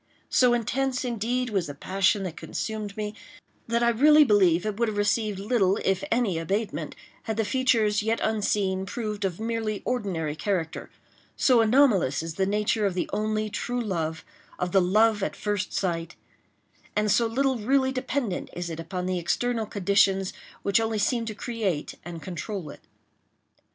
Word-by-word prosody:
So 250 -2 +5
intense, 255 +3 -1
indeed, 245 +1 -1
was 190 -6 0
the 145 - -7
passion 195 +5 +1
that 180 -4 -5
consumed 215 -2 -5
me, 210 -1 -3 0.5
that 235 +1 +1
I 235 - +4
really 300 +6 +6
believe 195 - +4
it 215 0 -3
would 235 - +2
have 215 -1 -3
received 205 0 +1
little 200 -2 +2
if 190 -1 +1
any 225 -8 +1
abatement 165 -3 -2 0.3
had 220 -1 -3
the 225 - +1
features, 225 -4 +2
yet 225 +2 0
unseen, 200 -3 0
proved 210 -2 -3
of 185 -1 -3
merely 220 -2 -2
ordinary 180 -11 -2
character; 170 -3 -2 0.5
so 250 -4 +4
anomalous 220 - +3
is 165 -1 -5
the 190 +3 0
nature 210 +1 +1
of 185 - -3
the 180 - -1
only 215 +1 0
true 240 +4 -3
love—of 175 -2 -4
the 195 - +5
love 210 +4 +3
at - - -2
first 205 -1 -2
sight—and 185 +3 -4
so 230 +2 +3
little 260 +2 0
really 265 +4 +2
dependent 255 -6 -2
is 175 -1 -4
it 165 - -6
upon 180 +2 -4
the 185 -1 -1
external 230 +5 -1
conditions 195 -1 +2 0.3
which 200 +2 +3
only 225 -1 -1
seem 230 +3 +1
to 215 -2 -5
create 205 -10 -2
and 170 -2 -8
control 185 -2 -5
it. - - -14
210 Hz, 160 wpm, -26 LUFS, 190-230 Hz, 0.5 s, really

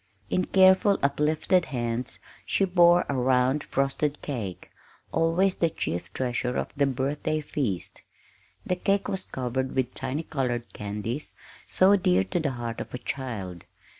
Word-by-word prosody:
In 185 - +2
careful, 190 +1 +5
uplifted 155 +5 +2
hands 120 -1 -3 0.3
she 195 - +1
bore 175 -1 +5
a - - -1
round 130 +2 +2
frosted 140 +2 -1
cake, 110 -11 -5 0.4
always 175 +4 +2
the 165 - +2
chief 90 - -4
treasure 125 -1 -1
of - - -3
the 140 0 +2
birthday 140 +4 -1
feast. 130 - -3 0.6
The 180 - 0
cake 195 +2 +1
was 190 -2 -2
covered 130 +1 -3
with 130 -1 0
the - - -7
tiny 135 +4 -2
colored 125 -6 -2
candies 105 +7 -5 0.3
so 190 +2 +5
dear 95 - +3
to 95 - -2
the 155 -3 0
heart 120 -2 -4
of - - -8
a - - -2
child. 115 -9 -5
135 Hz, 150 wpm, -27 LUFS, 120-165 Hz, 0.6 s, careful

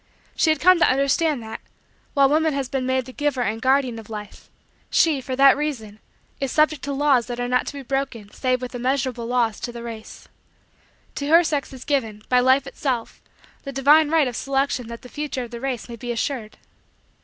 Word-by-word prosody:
She 320 - +2
had 310 -2 +2
come 365 +2 +5
to - - +5
understand 275 +1 +1
that, 220 - -7 0.5
while 275 -1 +5
woman 310 +1 +2
has 275 -2 -2
been 255 -1 -2
made 260 -1 0
the 255 - -11
giver 290 -3 -1
and 225 0 -2
guardian 260 -2 +2
of 220 - -13
Life, 210 -2 -9 0.4
she, 310 -5 +3
for 260 0 -4
that 275 +1 +6
reason, 240 -8 -4 0.4
is 275 -2 -2
subject 305 -2 +2
to 285 - -3
laws 275 -4 +2
that 245 -1 -5
are 245 - -1
not 250 0 +1
to - - -4
be 280 -1 -7
broken 260 -5 -3
save 255 -1 -1
with 250 - -6
immeasurable 245 -1 -1
loss 240 -3 0
to 240 - -5
the 235 0 -8
race. 225 -2 -9 0.9
To 285 - -4
her 335 +3 +6
sex 295 -4 -2
is 260 -1 -10
given, 225 -8 -1
by 250 - +4
Life 260 +2 +4
itself, 250 -5 -3 0.4
the 275 - -7
divine 290 +3 +5
right 315 -3 +3
of 245 - -5
selection 270 -2 -1
that 235 0 -9
the - - -10
future 290 -1 -4
of 240 - -10
the 235 -1 -7
race 260 -4 -3
may 235 -1 -8
be 240 +2 -5
assured. 235 -2 -3
260 Hz, 210 wpm, -23 LUFS, 240-280 Hz, 0.9 s, that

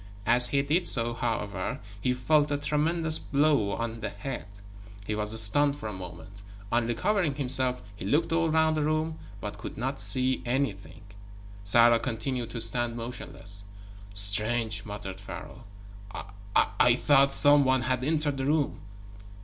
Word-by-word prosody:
As 120 +2 +5
he 140 +2 0
did 160 +6 0
so, 120 -1 +3
however, 115 -4 -4 0.2
he 125 - 0
felt 145 +4 +1
a 145 - -1
tremendous 155 +2 +3
blow 140 -8 0
on 115 0 -5
the - - -5
head. 135 -9 -7 0.6
He 105 - -4
was 105 +1 +2
stunned 140 +7 +4
for 110 - -8
a 105 - -6
moment. 95 +2 -11 0.3
On 120 -1 0
recovering 155 - -1
himself 130 -2 +1
he 100 - -10
looked 150 +12 0
all 165 0 +1
round 160 0 +1
the 155 - -1
room, 155 +1 -2 0.2
but 105 0 -7
could - - -9 0.2
see 130 +5 +3
nothing. 120 -6 -4 0.6
Sarah 115 +3 +4
continued 120 0 -4
to 115 - -7
stand 115 +1 +1
motionless. 115 -4 -5 0.5
"Strange," 105 +2 +2
muttered 100 -2 -8
Pharaoh. 100 - -10 0.5
"I - - -8 0.5
I 120 -1 +4
thought 140 +1 +3
some 145 +1 +7
one 130 -2 +1
had 130 +1 -2
entered 150 -1 -1
the 135 - -3
room." 150 0 -1
125 Hz, 150 wpm, -27 LUFS, 110-145 Hz, 0.6 s, some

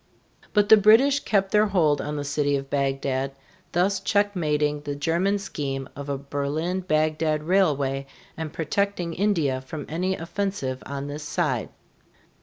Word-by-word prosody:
But 205 -1 +3
the 220 - +10
British 230 +8 +5
kept 195 -6 0
their 210 0 +4
hold 160 -7 +2
on 150 +1 -4
the 145 - -3
city 145 0 0
of 135 0 -4
Bagdad, 135 -1 -1 0.4
thus 185 +2 +2
checkmating 155 -8 +1
the 145 -1 -4
German 170 +7 +1
scheme 140 -8 -4
of 140 0 -7
a 140 - -1
Berlin 145 +6 -2
Bagdad 155 -3 0
railway 145 -7 +1 0.3
and 160 -2 -5
protecting 175 +2 -1
India 165 -9 +1
from 145 +2 -7
any 180 +4 -1
offensive 170 -7 -3
on 140 0 -4
this 145 +1 -6
side. 150 -5 -1
155 Hz, 145 wpm, -25 LUFS, 140-190 Hz, 0.4 s, the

